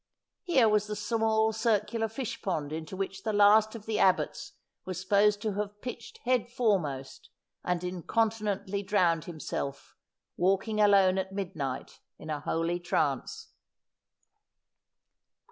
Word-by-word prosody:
Here 275 Hz, -, +3 dB
was 210 Hz, -1 st, +2 dB
the 210 Hz, -, -3 dB
small 220 Hz, +1 st, +1 dB
circular 225 Hz, 0 st, 0 dB
fish 225 Hz, +2 st, -5 dB
pond 155 Hz, -6 st, -2 dB
into 160 Hz, +4 st, -6 dB
which 195 Hz, 0 st, -4 dB
the 220 Hz, -, -1 dB
last 210 Hz, +2 st, +5 dB
of 215 Hz, -2 st, -9 dB
the 220 Hz, -1 st, -1 dB
abbots 185 Hz, -1 st, +1 dB, 0.3 s
was 185 Hz, -1 st, -5 dB
supposed 205 Hz, +1 st, +3 dB
to 215 Hz, -2 st, -1 dB
have 205 Hz, +1 st, -4 dB
pitched 240 Hz, 0 st, -8 dB
headfore 240 Hz, -4 st, +2 dB
most, 135 Hz, -3 st, -7 dB, 0.3 s
and 180 Hz, 0 st, -1 dB
incontinently 205 Hz, +2 st, -1 dB
drowned 175 Hz, -5 st, +1 dB
himself, 150 Hz, -4 st, -5 dB, 0.4 s
walking 195 Hz, +4 st, +1 dB
alone 195 Hz, -2 st, +5 dB
at 190 Hz, 0 st, -3 dB
mid 195 Hz, -4 st, -4 dB
night 135 Hz, -4 st, -5 dB, 0.2 s
in 155 Hz, -, -7 dB
a 150 Hz, -, -2 dB
holy 165 Hz, +3 st, -1 dB
trance. 150 Hz, -6 st, -1 dB
200 Hz, 130 wpm, -29 LUFS, 175-220 Hz, 0.4 s, last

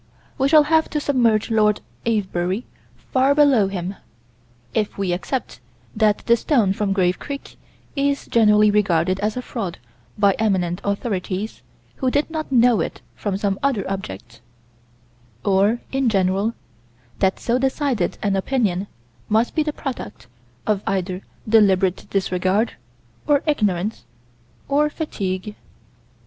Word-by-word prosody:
We 270 Hz, -, +3 dB
shall 305 Hz, 0 st, +7 dB
have 315 Hz, +1 st, +2 dB
to 300 Hz, -, -1 dB
submerge 235 Hz, -6 st, +2 dB
Lord 210 Hz, -1 st, +3 dB, 0.3 s
Avebury 190 Hz, -1 st, -1 dB, 0.5 s
far 270 Hz, +2 st, +4 dB
below 275 Hz, -9 st, +5 dB
him 190 Hz, 0 st, -4 dB, 0.8 s
if 210 Hz, -1 st, -1 dB
we 195 Hz, -3 st, 0 dB
accept 185 Hz, +9 st, -3 dB, 0.4 s
that 215 Hz, -1 st, +2 dB
the 235 Hz, -, +5 dB
stone 230 Hz, -5 st, +2 dB
from 200 Hz, 0 st, -1 dB
Grave 185 Hz, -2 st, +1 dB
Creek 280 Hz, -1 st, -7 dB, 0.4 s
is 280 Hz, 0 st, 0 dB
generally 210 Hz, -2 st, +4 dB
regarded 185 Hz, -3 st, +2 dB
as 210 Hz, +3 st, -1 dB
a 250 Hz, -, -3 dB
fraud 195 Hz, -10 st, -4 dB, 0.4 s
by 200 Hz, -1 st, +4 dB
eminent 185 Hz, -4 st, 0 dB
authorities 200 Hz, 0 st, -3 dB, 0.4 s
who 260 Hz, -, +1 dB
did 290 Hz, +5 st, 0 dB
not 310 Hz, -3 st, -4 dB
know 245 Hz, -3 st, +5 dB
it -, -, -4 dB
from 200 Hz, -2 st, -2 dB
some 200 Hz, -1 st, -1 dB
other 265 Hz, -8 st, 0 dB
object 120 Hz, -, -6 dB, 1.0 s
or, 200 Hz, +4 st, +3 dB
in 270 Hz, -2 st, +1 dB
general, 195 Hz, +2 st, +1 dB, 0.6 s
that 190 Hz, -1 st, +1 dB
so 240 Hz, +2 st, 0 dB
decided 270 Hz, -2 st, 0 dB
an 200 Hz, -2 st, +1 dB
opinion 200 Hz, -3 st, 0 dB, 0.4 s
must 220 Hz, +3 st, +2 dB
be 315 Hz, -, +1 dB
the 300 Hz, 0 st, -1 dB
product 270 Hz, -6 st, -6 dB, 0.4 s
of 210 Hz, -2 st, +1 dB
either 185 Hz, -1 st, -1 dB, 0.3 s
deliberate 195 Hz, -4 st, +3 dB
disregard 190 Hz, +3 st, 0 dB, 0.5 s
or 290 Hz, -2 st, +3 dB
ignorance 210 Hz, -, 0 dB, 0.6 s
or 295 Hz, +2 st, +2 dB
fatigue. 205 Hz, -, -4 dB
210 Hz, 130 wpm, -21 LUFS, 190-255 Hz, 1.0 s, shall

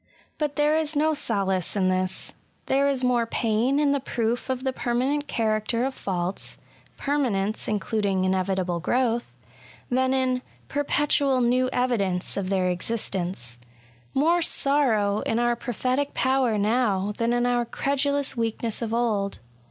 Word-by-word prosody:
But 295 Hz, -2 st, -1 dB
there 295 Hz, +1 st, +3 dB
is 315 Hz, -1 st, 0 dB
no 310 Hz, +2 st, +3 dB
solace 195 Hz, -, 0 dB
in 190 Hz, -2 st, +2 dB
this. 185 Hz, 0 st, -1 dB, 0.3 s
There 275 Hz, +1 st, +2 dB
is 265 Hz, -2 st, 0 dB
more 245 Hz, -2 st, +2 dB
pain 230 Hz, +5 st, +1 dB
in 290 Hz, -1 st, +3 dB
the 280 Hz, -, +1 dB
proof 240 Hz, 0 st, -2 dB
of 260 Hz, 0 st, -2 dB
the 265 Hz, -1 st, -1 dB
permanent 260 Hz, +5 st, -1 dB
character 225 Hz, 0 st, 0 dB
of 270 Hz, -, -2 dB
faults 185 Hz, -3 st, -4 dB, 0.4 s
(per 290 Hz, +1 st, 0 dB
manence 215 Hz, -5 st, -1 dB
including 205 Hz, -2 st, 0 dB
inevitable 185 Hz, -2 st, 0 dB
growth), 240 Hz, +4 st, 0 dB, 0.6 s
than 260 Hz, +1 st, +2 dB
in 260 Hz, -1 st, +1 dB
* -, -, -32 dB
perpetual 285 Hz, -1 st, +2 dB
niew 250 Hz, +1 st, +2 dB
evidence 200 Hz, -8 st, 0 dB
of 195 Hz, -2 st, -2 dB
their 190 Hz, -2 st, +1 dB
existence; 180 Hz, -, -3 dB, 0.6 s
more 330 Hz, +6 st, +3 dB
sorrow 235 Hz, -10 st, +2 dB
in 225 Hz, -, -1 dB
our 240 Hz, 0 st, +2 dB
prophetic 255 Hz, +4 st, -2 dB
power 260 Hz, -4 st, +2 dB
now 210 Hz, -2 st, +1 dB
than 230 Hz, 0 st, +1 dB
in 240 Hz, 0 st, +1 dB
our 245 Hz, -1 st, +2 dB
credulous 280 Hz, +3 st, 0 dB
weakness 230 Hz, -1 st, -1 dB
of 230 Hz, -1 st, -1 dB
old. 210 Hz, -5 st, 0 dB
240 Hz, 145 wpm, -25 LUFS, 200-265 Hz, 0.6 s, there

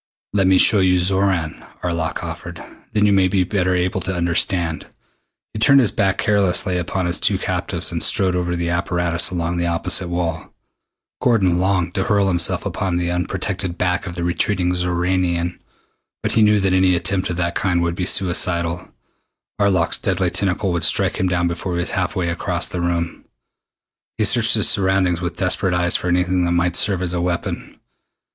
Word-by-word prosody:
"Let 95 Hz, -2 st, +2 dB
me 95 Hz, 0 st, +4 dB
show 105 Hz, +2 st, +6 dB
you 90 Hz, -1 st, +3 dB
Xoran," 95 Hz, -3 st, 0 dB, 0.2 s
Arlok 85 Hz, -1 st, -3 dB
offered. 85 Hz, +1 st, -7 dB, 0.3 s
"Then 105 Hz, -1 st, +2 dB
you 105 Hz, -, +3 dB
may 95 Hz, -1 st, +3 dB
be 95 Hz, 0 st, +1 dB
better 90 Hz, -1 st, 0 dB
able 90 Hz, +1 st, -1 dB
to 95 Hz, 0 st, -3 dB
understand." 85 Hz, -1 st, 0 dB, 0.7 s
He 110 Hz, -, -5 dB
turned 140 Hz, +5 st, +5 dB
his 120 Hz, -6 st, +3 dB
back 95 Hz, -2 st, 0 dB
carelessly 95 Hz, -3 st, +1 dB
upon 90 Hz, +1 st, -3 dB
his 85 Hz, 0 st, -2 dB
two -, -, +1 dB
captives -, -, -3 dB
and -, -, -3 dB
strode 95 Hz, -2 st, +2 dB
over 90 Hz, -1 st, -1 dB
to -, -, -2 dB
the 85 Hz, 0 st, -2 dB
apparatus 85 Hz, -1 st, 0 dB
along 85 Hz, -1 st, -3 dB
the 85 Hz, 0 st, -1 dB
opposite 85 Hz, +2 st, -1 dB
wall. 85 Hz, -2 st, -4 dB, 0.7 s
Gordon 95 Hz, -8 st, +2 dB
longed 90 Hz, -2 st, 0 dB
to 95 Hz, -, -1 dB
hurl 100 Hz, -2 st, +2 dB
himself 85 Hz, -2 st, 0 dB
upon 90 Hz, -3 st, -2 dB
the 85 Hz, 0 st, -1 dB
unprotected 90 Hz, +1 st, -3 dB
back 90 Hz, +1 st, -1 dB
of 85 Hz, -, -7 dB
the 85 Hz, -, -4 dB
retreating 90 Hz, +1 st, 0 dB
Xoranian, 90 Hz, 0 st, -1 dB, 0.6 s
but -, -, 0 dB
he 110 Hz, -, +3 dB
knew 105 Hz, -1 st, +4 dB
that 95 Hz, -1 st, 0 dB
any 95 Hz, -1 st, +3 dB
attempt 90 Hz, +2 st, 0 dB
of 85 Hz, -, -4 dB
that 85 Hz, -1 st, -1 dB
kind 90 Hz, -2 st, 0 dB
would 85 Hz, 0 st, -1 dB
be 90 Hz, +1 st, -3 dB
suicidal. 85 Hz, -2 st, 0 dB, 0.7 s
Arlok's 95 Hz, -4 st, +2 dB
deadly 95 Hz, -2 st, 0 dB
tentacle 95 Hz, 0 st, 0 dB
would 85 Hz, -2 st, -2 dB
strike -, -, +2 dB
him 95 Hz, -, +1 dB
down 85 Hz, -1 st, 0 dB
before 85 Hz, +2 st, -4 dB
he 85 Hz, -, -2 dB
was 85 Hz, -, 0 dB
halfway 90 Hz, -2 st, -2 dB
across 85 Hz, +1 st, -1 dB
the 90 Hz, -, -4 dB
room. 85 Hz, -1 st, -3 dB, 0.9 s
He -, -, +1 dB
searched -, -, +4 dB
his -, -, +3 dB
surroundings 95 Hz, -3 st, +1 dB
with 90 Hz, -1 st, -4 dB
desperate 90 Hz, 0 st, +2 dB
eyes 90 Hz, 0 st, +3 dB
for -, -, -2 dB
anything 90 Hz, +1 st, +1 dB
that 85 Hz, -, 0 dB
might 85 Hz, 0 st, 0 dB
serve 95 Hz, -2 st, +2 dB
as 90 Hz, -1 st, 0 dB
a 90 Hz, -, -1 dB
weapon. 85 Hz, -1 st, -4 dB
90 Hz, 185 wpm, -19 LUFS, 85-95 Hz, 0.9 s, show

